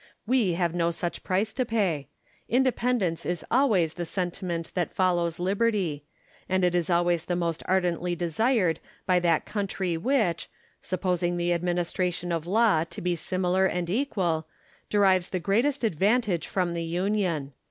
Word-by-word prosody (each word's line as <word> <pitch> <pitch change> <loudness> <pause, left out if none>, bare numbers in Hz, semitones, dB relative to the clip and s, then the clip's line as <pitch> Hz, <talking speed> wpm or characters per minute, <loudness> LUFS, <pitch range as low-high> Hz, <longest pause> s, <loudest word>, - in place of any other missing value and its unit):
We 230 -6 +2
have 170 -1 0
no 170 -1 +1
such 170 +1 -4
price 200 +4 0
to 255 - 0
pay. 195 - 0 0.4
Independence 245 -8 +1
is 175 -1 -3
always 215 - +3
the 175 - -4
sentiment 175 -2 -3
that 175 -3 -2
follows 175 -3 +1
liberty; 190 -6 0 0.4
and 185 0 +1
it 175 - +2
is 175 -1 0
always 175 -1 +2
the 175 - -1
most 170 -2 -1
ardently 180 -1 +1
desired 180 - +1 0.3
by 180 -1 +3
that 170 -2 +2
country 190 -4 -2
which, 210 - 0 0.3
supposing 180 -2 -1
the 175 0 +1
administration 175 0 -1
of 165 -1 -2
law 205 -5 +3
to - - -9
be 175 0 0
similar 185 +2 +1
and 175 -2 -2
equal, 185 - 0 0.4
derives 190 -3 +3
the 185 - -2
greatest 240 - +1
advantage 205 -1 +1
from 180 -3 -1
the 170 -1 -2
union. 170 -4 -1
180 Hz, 150 wpm, -27 LUFS, 170-200 Hz, 0.4 s, always